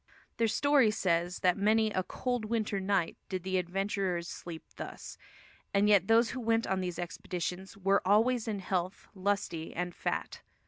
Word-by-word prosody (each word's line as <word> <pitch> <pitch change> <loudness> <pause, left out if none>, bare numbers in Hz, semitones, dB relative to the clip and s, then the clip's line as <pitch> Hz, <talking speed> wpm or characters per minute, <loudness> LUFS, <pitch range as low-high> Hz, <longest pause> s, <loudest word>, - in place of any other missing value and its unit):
Their 230 - +3
story 280 +1 +4
says 175 -3 0
that 180 -1 +3
many 215 +1 +3
"a 185 - 0
cold 245 +4 -2
winter 215 -2 -1
night" 190 -3 0
did 185 -2 -3
the 190 0 0
adventurers 185 -1 -1
sleep 170 -2 -7
thus; - - -7 0.6
and 200 +1 +4
yet 200 -3 +5
those 230 +1 +4
who 260 - -4
went 230 -1 +1
on 190 0 0
these 180 -2 -3
expeditions 180 +2 -4
"were 195 0 +2
always 225 +4 +3
in 205 -3 -2
health, 185 0 -2
lusty 190 -4 -2
and 180 0 -2
fat." - - -3
195 Hz, 165 wpm, -31 LUFS, 180-220 Hz, 0.6 s, yet